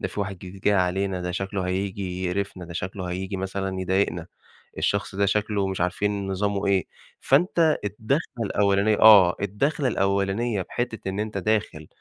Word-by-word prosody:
ده - - -2
في - - -5
واحد 100 -2 -4
جديد 95 +1 -10
جاي 105 +1 +3
علينا، 95 0 0
ده 90 0 -3
شكله 95 +1 -3
هييجي 95 0 -3
يقرِفنا، 95 0 -3
ده 85 - -9
شكله 90 +2 -4
هييجي 95 +2 -4
مثلًا 95 0 -3
يضايقنا 95 -3 0 0.5
الشخص - - -1
ده 100 +1 +2
شكله 105 0 0
مش 95 -2 -3
عارفين 100 +3 -1
نظامُه 100 +1 -1
إيه، 95 -2 +2 0.3
فأنت 160 +2 +3
الدَخلة 115 +3 -2
الأولانية 100 +1 +2
آه، 100 -5 +8
الدَخلة 130 +9 0
الأولانية 100 +1 0
بحتِّة 115 0 -4
إن 95 +2 -4
أنت 105 -1 -3
داخل 100 -6 -1
100 Hz, 160 wpm, -25 LUFS, 95-105 Hz, 0.5 s, آه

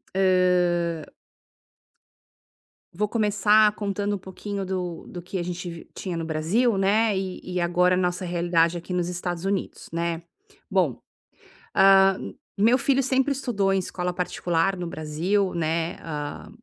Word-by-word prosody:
hã 180 -3 +2 1.9
Vou 210 +5 0
começar 210 0 +4
contando 205 0 -2
um - - -3
pouquinho 195 +1 -6
do 180 -3 -4
do 175 - -7
que 180 +2 -5
a 175 - -2
gente 180 0 -5
vi 170 -1 -10
tinha 180 -3 -4
no 165 - -3
Brasil, 185 +9 +1
né, 205 +2 +2
e 190 -1 -4 0.2
e 180 - +1
agora 180 +1 +3
a - - 0
nossa 180 0 -1
realidade 170 -1 +1
aqui 175 +2 -6
nos 175 -1 0
Estados 175 0 -4
Unidos, 195 -1 -3
né? 170 0 -1 0.5
Bom, - - +1 0.8
ah, 195 0 +6 0.4
meu 225 +5 +5
filho 275 +1 +2
sempre 265 +2 +2
estudou 205 -8 0
em 195 - +2
escola 180 -1 -3
particular 180 +1 0
no 175 -1 -4
Brasil, 170 +6 -1
né. 165 0 -1
Ah, 150 -2 -6
180 Hz, 145 wpm, -25 LUFS, 170-200 Hz, 1.9 s, ah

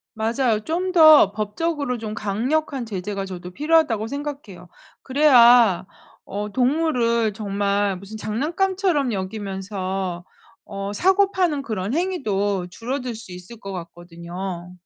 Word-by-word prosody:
맞아요. 225 0 0
'좀 360 +3 -1
더 310 - +8
법적으로 250 +6 -2
좀 215 -1 -5
강력한 250 +6 -1
제재가 195 -1 -4
저도 180 -1 -8
필요하다.'고 295 - +2
생각해요. 280 - -7 0.3
그래야 245 - +5 0.4
어 205 +2 -4
동물을 245 -5 +1
정말 200 -1 -1
무슨 200 +4 -10
장난감처럼 305 - 0
여기면서 190 -2 -4 0.4
어 200 0 -5
사고 385 - +3
파는 340 -8 0
그런 215 -1 -3
행위도 205 - -1
줄어들 250 +3 -4
수 220 -5 -10
있을 180 +6 -10
것 195 0 -7
같거든요. 175 +1 -7
220 Hz, 275 characters per minute, -22 LUFS, 195-285 Hz, 0.4 s, 더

